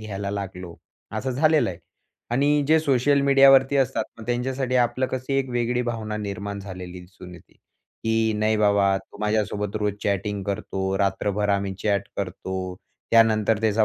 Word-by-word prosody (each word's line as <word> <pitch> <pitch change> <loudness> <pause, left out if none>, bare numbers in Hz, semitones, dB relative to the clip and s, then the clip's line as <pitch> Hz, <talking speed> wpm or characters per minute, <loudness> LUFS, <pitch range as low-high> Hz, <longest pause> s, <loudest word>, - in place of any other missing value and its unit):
घ्यायला 100 -2 -5
लागलो. 95 -3 -6 0.4
असं 125 +5 -2
झालेलं 155 -2 +3
आहे. 85 - -9 0.5
आणि 145 +4 +2
जे 160 0 +6
सोशल 140 0 +2
मीडियावरती 135 0 +6
असतात. 135 -1 +1
मग 110 - -10
त्यांच्यासाठी 130 +1 -1
आपलं 125 +1 +1
कशी 130 +1 -3
एक 135 -1 -1
वेगळी 120 0 0
भावना 110 -3 -3
निर्माण 100 -1 -5
झालेली 90 -2 -8
दिसून 90 0 -13
येते, 85 - -17
की 110 0 -3
नाही 110 +1 +1
बाबा 100 -2 +3
तो 95 - -17
माझ्यासोबत 105 -1 -1
रोज 105 -1 0
चॅटिंग 100 0 -1
करतो. 95 -1 -2
रात्रभर 100 +1 0
आम्ही 100 -1 0
चॅट 100 -2 0
करतो. 95 -1 -4 0.3
त्यानंतर 110 -1 +4
त्याचा 110 0 +3
105 Hz, 150 wpm, -24 LUFS, 100-125 Hz, 0.5 s, जे